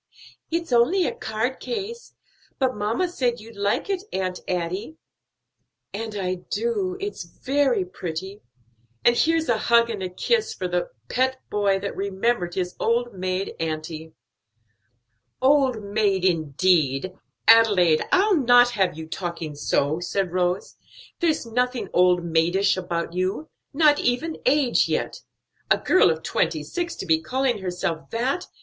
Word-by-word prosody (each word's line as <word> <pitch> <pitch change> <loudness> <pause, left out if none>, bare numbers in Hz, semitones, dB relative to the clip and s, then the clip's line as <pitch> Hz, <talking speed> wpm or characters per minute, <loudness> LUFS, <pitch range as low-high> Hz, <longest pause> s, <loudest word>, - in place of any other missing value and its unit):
"It's 335 -2 -2
only 325 +11 +4
a - - -1
card 220 +4 -3
case; 465 +1 -6 0.4
but 260 -2 +1
mamma 215 - 0
said 250 -8 -1
you'd 225 +1 -13
like 200 0 0
it, 390 -2 -1
Aunt 185 -1 -2
Adie." 185 - -3 1.0
"And 215 +1 -5
I 185 -2 -2
do; 410 -6 -1
it's 405 - -5
very 265 +3 0
pretty. 185 +2 -6 0.6
And 240 - +6
here's 325 +3 +2
a 230 -2 +1
hug 235 +1 +3
and 205 -3 -5
a 185 - -3
kiss 450 - 0
for 185 - -3
the 180 0 -1 0.2
pet 260 +1 0
boy 200 -2 +2
that 200 - -4
remembered 195 -1 -1
his 180 -1 -2
old 240 +1 0
maid 185 0 -3
auntie." 160 0 -4 1.3
"Old 260 -4 +3
maid, 200 -2 0
indeed! 160 -1 +1 0.3
Adelaide, 205 -8 +6
I'll 390 0 +4
not 245 -2 +5
have 190 -8 0
you 160 - -6
talking 170 -2 -5
so," 145 +1 0
said 180 +1 -2
Rose. 180 +1 -1 0.4
"There's 325 -7 +1
nothing 250 +2 -1
old 180 -1 +4
maidish 170 +4 +2
about 170 -2 -3
you; 185 - -2 0.2
not 300 0 +4
even 310 +7 -1
age 270 -2 +3
yet; - - -2 0.5
a - - +5
girl 370 - +4
of 160 0 -2
twenty 160 -2 0
six 340 - -4
to - - -6
be 160 -2 +2
calling 255 +5 0
herself 180 -3 -3
that! 255 +9 -1
205 Hz, 145 wpm, -24 LUFS, 180-260 Hz, 1.3 s, And